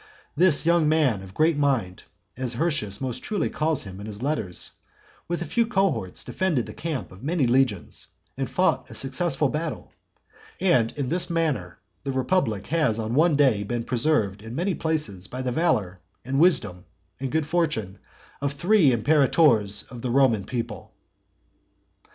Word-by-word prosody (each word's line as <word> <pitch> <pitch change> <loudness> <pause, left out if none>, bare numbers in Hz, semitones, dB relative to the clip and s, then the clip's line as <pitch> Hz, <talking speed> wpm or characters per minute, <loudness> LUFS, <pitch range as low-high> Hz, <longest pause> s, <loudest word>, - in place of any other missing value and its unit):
This 165 -2 +4
young 170 -2 +3
man 145 -10 +2
of 95 0 -12
great 160 +1 +3
mind, 130 -11 0 0.3
as 125 -1 -2
Hirtius 120 - -1
most 130 -3 -3
truly 205 -7 -1
calls 155 -1 0
him 95 -1 -9
in 100 - -7
his 105 -1 -7
letters, 120 - -3 0.6
with 175 0 -2
a - - -7
few 235 +4 +1
cohorts 180 - 0
defended 170 -11 -1
the - - -9
camp 160 -5 -4
of 95 +2 -13
many 155 0 0
legions, 120 -6 0 0.3
and - - -3
fought - - +1
a - - -9
successful - - 0
battle. - - -4 0.7
And 125 -11 +3
in 135 -3 -2
this 175 +2 0
manner 150 - -1 0.3
the 140 - -2
republic 130 - 0
has 150 -8 +1
on 110 0 -3
one 155 +3 +4
day 130 -8 +3
been 115 +3 -3
preserved 115 -6 +1
in 110 +2 -8
many 180 +6 0
places 150 - -2
by 130 +1 -5
the 125 - -1
valour, 115 - 0 0.3
and 135 +2 -1
wisdom, 110 - +2 0.3
and 135 -1 -3
good 160 -1 0
fortune 145 - -1 0.4
of 140 0 -1
three 175 +2 +4
imperators 120 -5 +3
of 120 -2 -8
the 125 - -3
Roman 120 -6 +3
people. 115 -4 -5 1.1
XI. - - -31
130 Hz, 165 wpm, -25 LUFS, 110-160 Hz, 1.1 s, This